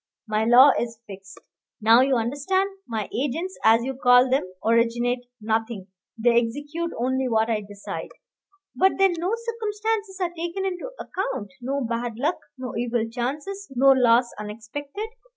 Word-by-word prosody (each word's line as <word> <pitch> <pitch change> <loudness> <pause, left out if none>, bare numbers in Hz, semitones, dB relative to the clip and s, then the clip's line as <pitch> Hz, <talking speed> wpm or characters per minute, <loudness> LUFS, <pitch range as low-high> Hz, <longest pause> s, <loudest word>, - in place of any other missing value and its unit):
My 215 0 0
law 250 +4 +8
is 230 -1 -4
fixed. 195 -1 -11 0.4
Now 225 +3 +6
you 265 0 +3
understand. 290 - 0 0.2
My 220 -3 -3
agents, 310 +9 -2
as 225 +1 +5
you 265 +2 -3
call 250 0 +5
them, 265 - +3 0.2
originate 240 +2 +1
nothing; 220 -2 -2 0.3
they 235 +1 +4
execute 290 +8 -4
only 260 +2 0
what 225 0 +2
I 215 -1 0
decide 205 0 -7 0.4
" 390 0 -40
"But 380 +1 +4
then 385 -1 +4
no 360 +4 -1
circumstances 435 -3 -3
are 350 -2 -1
taken 345 +3 -3
into 375 +5 -3
account, 265 - -4
no 275 +3 -2
bad 235 -1 -3
luck, 300 +8 0 0.2
no 255 -1 -6
evil 235 -1 -1
chances, 295 +12 -4
no 270 +2 +6
loss 245 -2 +4
unexpected." 230 - -6
255 Hz, 150 wpm, -24 LUFS, 230-345 Hz, 0.4 s, law